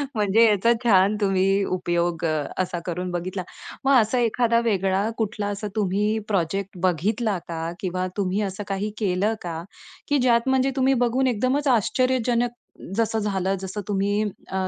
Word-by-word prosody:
म्हणजे 210 +2 +4
याचा 215 +1 +3
छान 200 -2 +4
तुम्ही 195 0 +2
उपयोग 175 -1 -1
अ, 155 -2 0 0.2
असा 180 -2 -1
करून 180 +1 -3
बघितला. 180 +2 -3 0.4
मग 275 - +4
असा 225 +4 0
एखादा 235 0 +2
वेगळा 195 -1 +1
कुठला 210 -2 -2
असा 205 +1 -3
तुम्ही 210 +1 +1
प्रोजेक्ट 195 0 -1
बघितला 200 +4 +1
का? 165 0 -4
किंवा 185 0 -2
तुम्ही 195 +1 0
असं 195 0 -3
काही 195 +2 -2
केलं 200 +1 +1
का? 165 -2 -5 0.5
की 290 - +3
ज्यात 245 0 +3
म्हणजे 265 0 +2
तुम्ही 265 0 +3
बघून 260 +3 +1
एकदमच 255 +5 0
आश्चर्यजनक 245 0 +2 0.5
जसं 225 -1 +1
झालं 195 -2 -1
जसं 190 +2 -5
तुम्ही 205 +1 0 0.3
अ, 190 0 -1
205 Hz, 150 wpm, -24 LUFS, 185-230 Hz, 0.5 s, म्हणजे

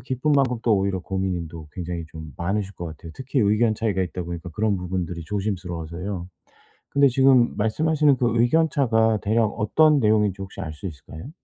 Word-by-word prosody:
기쁨만큼 130 0 +1
또 115 -3 +3
오히려 95 -1 -1
고민인 95 -3 -3
또 80 -2 -10
굉장히 85 0 -5
좀 80 -3 -9
많으실 100 +2 -2
것 85 - -7
같아요. 80 +1 -9
특히 130 0 -2
의견 110 +2 +3
차이가 105 -4 -1
있다 90 +1 -4
보니까 85 0 -6
그런 105 +4 0
부분들이 90 -1 -4
조심스러워서요. 90 -2 -4 0.6
근데 140 0 +4
지금 130 -1 +4
말씀하시는 145 +6 +2
그 120 -1 +2
의견차가 120 -6 +2
대략 110 +2 +2
어떤 145 +9 +3
내용인지 105 -3 +2
혹시 95 - -7
알 80 - -5
수 95 +6 -7
있을까요? 80 - -10
105 Hz, 410 characters per minute, -23 LUFS, 90-120 Hz, 0.6 s, 근데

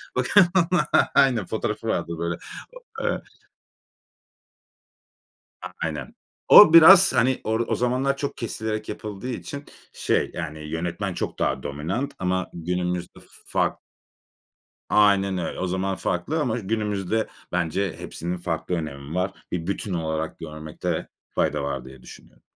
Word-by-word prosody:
Bakın 205 -3 +5 0.7
aynen 125 -8 +4
fotoğrafı - - -3
vardır 85 -1 -2
böyle. 85 0 -2 0.7
Ö - - +1
eee - - -5 2.4
A - - -5 0.2
aynen. - - -5 0.3
O 185 -6 +10
biraz 185 +4 +9
hani, 130 +2 +2
or 110 +1 0
o - - 0
zamanlar 130 +3 0
çok 140 0 -4
kesilerek 110 -2 -4
yapıldığı 105 +3 -6
için 140 +3 -6 0.3
şey, - - 0
yani, 80 -3 -5
yönetmen 85 +4 -3
çok - - -4
daha - - 0
dominant 85 - -3
ama 95 0 -1
günümüzde 90 +1 -3
f - - -17 0.2
fark - - 0 1.1
Aynen 100 -2 +4
öyle. 90 - -4
O 95 - -1
zaman 95 +1 -1
farklı 115 - -2
ama 120 -4 -1
günümüzde 105 0 -1 0.2
bence 90 +1 -1
hepsinin 90 +2 -5
farklı 85 +1 -3
önemi 75 -1 -6
var. 95 +1 0 0.2
Bir 85 -1 -3
bütün 100 -1 -2
olarak 80 -1 -3
görmekte 80 +2 -5 0.3
fayda 75 -2 +1
var 70 -2 -3
diye 65 -1 -13
düşünüyorum. - - -15
95 Hz, 130 wpm, -24 LUFS, 85-110 Hz, 2.4 s, O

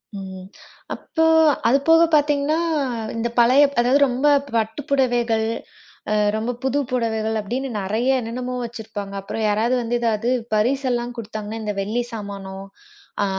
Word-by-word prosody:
ம், 190 -1 -8 0.5
அப்போ 320 - -2 0.4
அது 265 +4 +5
போகப் 330 0 +5
பாத்தீங்கன்னா, 295 +1 +2 0.6
இந்தப் 235 +1 -3
பழைய 255 +5 +6 0.2
அதாவது 250 +4 +4
ரொம்ப 255 +4 0 0.3
பட்டுப்புடவைகள், 235 -1 0 0.6
அ - - +2 0.2
ரொம்ப 225 +3 -1
புது 265 +2 +1
புடவைகள் 220 -2 -1
அப்பிடின்னு 255 +6 -3
நறைய 240 +7 +1
என்னென்னமோ 250 +2 -4
வச்சிருப்பாங்க. 220 -4 -7
அப்புறம் 220 +3 -4
யாராவது 220 +4 +1
வந்து 240 +1 -1
எதாவது 230 +1 0 0.3
பரிசு 265 +6 +1
எல்லாம் 240 0 -2
கொடுத்தாங்கன்னா, 215 0 -6
இந்த 210 -1 -2
வெள்ளிச் 240 +4 -3
சாமானோ! 200 -3 -6 0.7
ஆ, - - +2
235 Hz, 130 wpm, -22 LUFS, 220-260 Hz, 0.7 s, பழைய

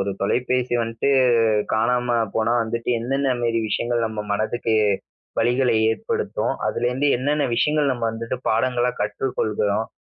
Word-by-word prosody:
ஒரு 100 +1 -1
தொலைபேசி 125 +4 0
வந்ட்டு 115 +3 -2 0.7
காணாம 120 +2 +1 0.2
போனா 110 +1 +1
வந்துட்டு 115 +1 -4
எந்தெந்த 135 +3 0
மேரி 115 -1 +1
விஷயங்கள் 120 +2 0
நம்ம 110 -1 -4
மனதுக்கு 110 +2 -1 0.6
வலிகள 125 +2 +2 0.2
ஏற்படுத்தும். 110 - -2
அதுலேருந்து 125 +4 0
என்னன்ன 145 +4 0
விஷயங்கள் 150 +2 +2
நம்ம 120 -2 -3
வந்துட்டு 115 +2 -4
பாடங்களா 125 +2 +1
கற்றுக் 105 +6 -2
கொள்கிறோம். 105 0 0
120 Hz, 125 wpm, -22 LUFS, 110-125 Hz, 0.7 s, வலிகள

